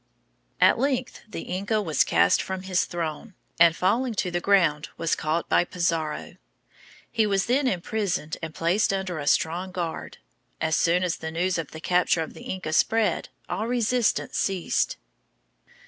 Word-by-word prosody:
At -, -, +5 dB
length 260 Hz, -2 st, -1 dB
the 195 Hz, -, -5 dB
Inca 200 Hz, +4 st, -1 dB
was 160 Hz, -8 st, +2 dB
cast -, -, +3 dB
from 190 Hz, -1 st, -5 dB
his 185 Hz, -1 st, +1 dB
throne, 175 Hz, +4 st, -5 dB, 0.2 s
and, 165 Hz, -1 st, +6 dB
falling 230 Hz, +7 st, +1 dB
to 185 Hz, -2 st, -1 dB
the 175 Hz, -, 0 dB
ground, 170 Hz, -7 st, +2 dB
was 165 Hz, -, 0 dB
caught 160 Hz, +2 st, -1 dB
by -, -, +4 dB
Pizarro. 165 Hz, -3 st, -2 dB, 0.7 s
He 225 Hz, -2 st, +2 dB
was 195 Hz, -1 st, +1 dB
then 265 Hz, +3 st, +2 dB
imprisoned 180 Hz, -5 st, -2 dB
and 160 Hz, -1 st, -5 dB
placed 175 Hz, +7 st, +1 dB
under 190 Hz, -4 st, -2 dB
a 145 Hz, -, -5 dB
strong 175 Hz, +6 st, +1 dB
guard. 175 Hz, -3 st, -5 dB, 0.4 s
As 160 Hz, -1 st, +1 dB
soon 175 Hz, +3 st, +2 dB
as 180 Hz, -2 st, -1 dB
the 160 Hz, -, -5 dB
news 175 Hz, +2 st, 0 dB
of 160 Hz, -, -4 dB
the 160 Hz, -, -9 dB
capture 175 Hz, -1 st, +2 dB
of -, -, -9 dB
the -, -, -12 dB
Inca 185 Hz, -4 st, -4 dB
spread, 215 Hz, +1 st, +2 dB, 0.2 s
all 220 Hz, -, -2 dB
resistance 245 Hz, -1 st, +1 dB
ceased. 195 Hz, -, 0 dB
180 Hz, 160 wpm, -25 LUFS, 165-205 Hz, 0.7 s, and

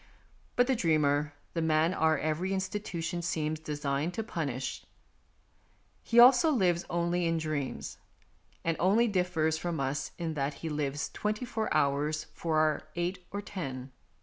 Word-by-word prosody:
But 245 Hz, -, +5 dB
the 265 Hz, 0 st, +2 dB
dreamer, 150 Hz, -5 st, +2 dB, 0.2 s
the 165 Hz, -, -1 dB
man 160 Hz, +2 st, +3 dB
our 160 Hz, -3 st, +3 dB
every 155 Hz, +6 st, -1 dB
institution 185 Hz, -3 st, -3 dB
seems 155 Hz, -2 st, -1 dB
designed 150 Hz, +2 st, -2 dB
to 225 Hz, -, -2 dB
punish, 140 Hz, -, -3 dB, 1.2 s
he 235 Hz, -, +3 dB
also 250 Hz, +6 st, +8 dB
lives 185 Hz, -, +2 dB
only 175 Hz, 0 st, 0 dB
in 165 Hz, 0 st, +1 dB
dreams, 155 Hz, -4 st, -3 dB, 0.6 s
and 165 Hz, -1 st, +1 dB
only 210 Hz, +7 st, +4 dB
differs 175 Hz, -5 st, +1 dB
from 170 Hz, -1 st, -2 dB
us 135 Hz, 0 st, -1 dB
in 165 Hz, -2 st, -2 dB
that 140 Hz, -1 st, -2 dB
he -, -, -1 dB
lives 145 Hz, -1 st, -2 dB
twenty 210 Hz, +3 st, -2 dB
four 225 Hz, -3 st, -2 dB
hours 145 Hz, +2 st, +1 dB
for 160 Hz, -2 st, -1 dB
our 155 Hz, 0 st, +2 dB
eight 175 Hz, +1 st, -3 dB
or 205 Hz, +1 st, -5 dB
ten. 135 Hz, -9 st, -6 dB
165 Hz, 150 wpm, -30 LUFS, 150-185 Hz, 1.2 s, also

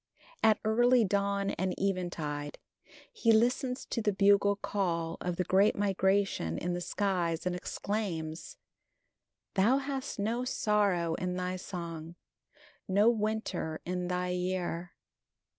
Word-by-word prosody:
At 215 Hz, -1 st, +5 dB
early 240 Hz, +2 st, +4 dB
dawn 200 Hz, 0 st, 0 dB
and 185 Hz, -1 st, -1 dB
eventide 170 Hz, -6 st, -2 dB, 0.6 s
he 235 Hz, -, +3 dB
listens 250 Hz, +3 st, +2 dB
to 230 Hz, -, -2 dB
the 210 Hz, -1 st, +2 dB
bugle 200 Hz, +1 st, +4 dB
call 170 Hz, -5 st, -2 dB
of 180 Hz, -1 st, -2 dB
the 180 Hz, -, 0 dB
great 195 Hz, +3 st, +3 dB
migration 195 Hz, -, +1 dB
in 175 Hz, +1 st, -2 dB
the 175 Hz, -, -3 dB
skies 175 Hz, -3 st, -1 dB
and 180 Hz, -1 st, 0 dB
exclaims: 180 Hz, -4 st, -4 dB, 1.0 s
Thou 215 Hz, +7 st, +4 dB
hast 275 Hz, 0 st, -4 dB
no 225 Hz, +4 st, -1 dB
sorrow 200 Hz, -8 st, +1 dB
in 180 Hz, +1 st, -2 dB
thy 180 Hz, 0 st, -2 dB
song, 170 Hz, -3 st, -6 dB, 0.7 s
No 205 Hz, +4 st, +5 dB
winter 215 Hz, -7 st, -2 dB
in 180 Hz, 0 st, -2 dB
thy 180 Hz, 0 st, -1 dB
year. 180 Hz, -1 st, -2 dB
190 Hz, 125 wpm, -31 LUFS, 175-210 Hz, 1.0 s, At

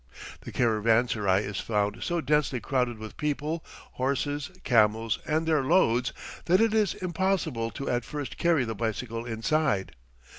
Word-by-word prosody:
The -, -, -8 dB
caravanserai 110 Hz, -3 st, +2 dB
is 100 Hz, -1 st, -4 dB
found 105 Hz, +1 st, -1 dB
so 170 Hz, -1 st, -1 dB
densely 150 Hz, -4 st, +1 dB
crowded 125 Hz, -3 st, -1 dB
with 110 Hz, 0 st, -9 dB
people, 150 Hz, +2 st, -2 dB, 0.3 s
horses, 140 Hz, +2 st, -1 dB
camels, 110 Hz, -1 st, +3 dB
and 160 Hz, +1 st, +1 dB
their 155 Hz, -4 st, +2 dB
loads 130 Hz, -6 st, +3 dB, 0.3 s
that 180 Hz, +2 st, +4 dB
it 225 Hz, -1 st, +3 dB
is 215 Hz, -2 st, +2 dB
impossible 170 Hz, -9 st, -1 dB
to 135 Hz, +6 st, -6 dB
at 120 Hz, -1 st, 0 dB
first 135 Hz, -5 st, -6 dB
carry 165 Hz, -7 st, +3 dB
the 115 Hz, -, -3 dB
bicycle 115 Hz, +2 st, -3 dB
inside. 115 Hz, -2 st, 0 dB
125 Hz, 145 wpm, -27 LUFS, 115-155 Hz, 0.3 s, that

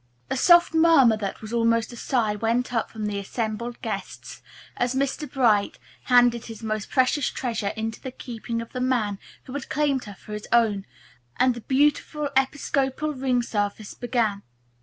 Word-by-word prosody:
A -, -, +1 dB
soft 345 Hz, +5 st, +5 dB
murmur 320 Hz, -8 st, +6 dB
that 200 Hz, 0 st, -5 dB
was 215 Hz, +1 st, -7 dB
almost 230 Hz, 0 st, +1 dB
a -, -, -8 dB
sigh 230 Hz, -3 st, 0 dB
went 230 Hz, +4 st, -1 dB
up 225 Hz, -2 st, 0 dB
from 215 Hz, -1 st, -5 dB
the 205 Hz, -1 st, -2 dB
assembled 225 Hz, +3 st, -4 dB
guests -, -, -6 dB, 0.3 s
as 245 Hz, +1 st, 0 dB
Mr. 275 Hz, +2 st, -1 dB
Bright 220 Hz, -7 st, +2 dB, 0.3 s
handed 245 Hz, -2 st, +4 dB
his 225 Hz, -1 st, -9 dB
most 215 Hz, -1 st, -3 dB
precious 260 Hz, +1 st, +2 dB
treasure 225 Hz, -5 st, -2 dB
into 220 Hz, 0 st, -4 dB
the 260 Hz, -, -5 dB
keeping 230 Hz, -2 st, -5 dB
of 230 Hz, -, -16 dB
the 250 Hz, -, -3 dB
man 225 Hz, -6 st, 0 dB, 0.2 s
who 255 Hz, -, -10 dB
had 285 Hz, -2 st, -5 dB
claimed 285 Hz, -3 st, 0 dB
her 205 Hz, -2 st, -9 dB
for 210 Hz, -, -11 dB
his 210 Hz, 0 st, -6 dB
own, 220 Hz, -4 st, +2 dB, 0.5 s
and 255 Hz, 0 st, +4 dB
the 240 Hz, -, -8 dB
beautiful 290 Hz, +2 st, +1 dB
Episcopal 275 Hz, +2 st, 0 dB
ring 255 Hz, -2 st, 0 dB
service 205 Hz, -2 st, -3 dB
began. 230 Hz, -5 st, -1 dB
240 Hz, 170 wpm, -25 LUFS, 220-265 Hz, 0.5 s, murmur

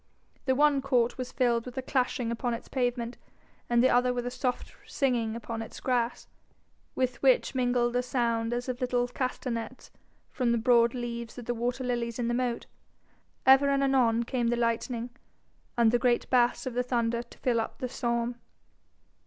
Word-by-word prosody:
The 260 Hz, -1 st, +2 dB
one 290 Hz, 0 st, +4 dB
court 255 Hz, -2 st, +1 dB
was 255 Hz, 0 st, -4 dB
filled 235 Hz, -2 st, +1 dB
with 250 Hz, +1 st, -9 dB
a 260 Hz, -, -2 dB
clashing 250 Hz, -3 st, 0 dB
upon 235 Hz, +1 st, -1 dB
its 230 Hz, -, -10 dB
pavement, 245 Hz, -2 st, -2 dB, 0.5 s
and 240 Hz, 0 st, +4 dB
the 260 Hz, -, +5 dB
other 250 Hz, +1 st, +3 dB
with 245 Hz, -1 st, -3 dB
a 245 Hz, -, -3 dB
soft 250 Hz, 0 st, -3 dB
singing 235 Hz, -5 st, 0 dB
upon 230 Hz, -1 st, -5 dB
its 225 Hz, -, -8 dB
grass, 245 Hz, -2 st, -1 dB, 0.7 s
with 255 Hz, -1 st, -1 dB
which 265 Hz, -1 st, +3 dB
mingled 245 Hz, -2 st, +1 dB
a 250 Hz, -, +3 dB
sound 235 Hz, -2 st, 0 dB
as 245 Hz, +1 st, -2 dB
of 255 Hz, 0 st, -4 dB
little 245 Hz, -1 st, +1 dB
castanets 245 Hz, -2 st, -4 dB, 0.4 s
from 250 Hz, -3 st, 0 dB
the -, -, +2 dB
broad 235 Hz, +1 st, +4 dB
leaves 235 Hz, -1 st, -5 dB
of 245 Hz, -, -7 dB
the 240 Hz, -, -1 dB
water 245 Hz, +2 st, -2 dB
lilies 240 Hz, -2 st, -2 dB
in 240 Hz, -1 st, -1 dB
the -, -, 0 dB
moat. 245 Hz, -1 st, -1 dB, 0.8 s
Ever 270 Hz, +1 st, +7 dB
and 275 Hz, 0 st, +2 dB
anon 245 Hz, -4 st, +3 dB
came 240 Hz, 0 st, -1 dB
the 240 Hz, -, +2 dB
lightning, 235 Hz, +1 st, -1 dB, 0.7 s
and 230 Hz, -2 st, +5 dB
the 245 Hz, -, +2 dB
great 245 Hz, -2 st, +2 dB
bass 245 Hz, 0 st, +3 dB
of 255 Hz, -, -3 dB
the 245 Hz, -, +1 dB
thunder 235 Hz, -2 st, 0 dB
to 240 Hz, -, -15 dB
fill 235 Hz, -3 st, +1 dB
up 225 Hz, -, -6 dB
the 255 Hz, -, -3 dB
psalm. 235 Hz, -1 st, -2 dB
245 Hz, 185 wpm, -28 LUFS, 235-255 Hz, 0.8 s, Ever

